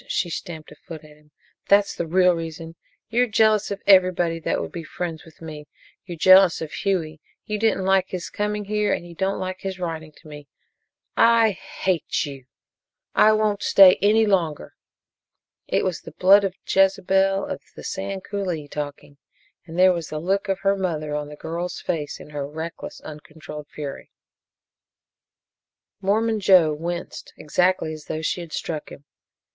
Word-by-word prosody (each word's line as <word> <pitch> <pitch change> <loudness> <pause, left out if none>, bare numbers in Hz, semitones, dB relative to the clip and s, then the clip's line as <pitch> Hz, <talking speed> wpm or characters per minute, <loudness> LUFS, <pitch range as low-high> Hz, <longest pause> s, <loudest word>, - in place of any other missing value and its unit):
She 175 - -1
stamped 160 -3 -7
a - - -12
foot 160 +1 -11
at 150 -1 -16
him. 150 0 -26 0.4
"That's 200 0 +4
the 170 - -4
real 180 +2 +4
reason. 165 -1 -6 0.4
You're 245 +2 +2
jealous 215 -1 +3
of 200 0 -5
everybody 180 -3 +4
that 160 - -1
would - - -5
be 170 - -6
friends 165 -1 -5
with 165 0 -17
me! 150 -2 -8 0.4
You're 175 -2 -7
jealous 185 +2 +6
of 155 -1 -6
Hughie. 160 -5 -2 0.2
You 210 0 -3
didn't 215 -3 +1
like 190 -1 +3
his 180 -2 -5
coming 210 0 -2
here 210 0 0
and - - -3
you 170 - -11
don't 190 +3 -1
like 185 0 -5
his 190 -1 -5
writing 160 -3 -5
to 160 - -18
me! 145 -1 -11 0.7
I 230 -1 +5
hate 185 -3 -2
you 135 -3 -9 0.7
I 215 - +5
won't 215 -1 0
stay 190 -2 +7
any 215 +2 +4
longer!" 175 -7 -1 0.9
It - - +1
was 175 -6 -2
the 165 - -11
blood 195 +4 +5
of 190 -2 -2
Jezebel 195 0 +2
of - - -5
the - - -10
Sand 195 0 -4
Coulee 180 -7 -4
talking, 145 0 -7 0.5
and 165 +1 -8
there 185 0 +6
was 170 -2 -5
the 155 - -4
look 195 +5 -1
of 195 0 -1
her 195 0 +2
mother 160 -6 -3
on 150 0 -3
the 150 - -9
girl's 170 +4 -5
face, 150 -4 -4
in 150 - -12
her 145 -2 -4
reckless, 160 +2 -7
uncontrolled 150 -1 -10
fury. 145 -2 -8 1.9
Mormon 220 +3 +1
Joe 185 -6 +5
winced, 170 +3 -6
exactly 175 0 0
as 155 -1 -10
though 155 - -4
she 175 - -1
had 170 -2 -10
struck 155 -2 -4
him. 140 - -12
175 Hz, 170 wpm, -23 LUFS, 155-195 Hz, 1.9 s, stay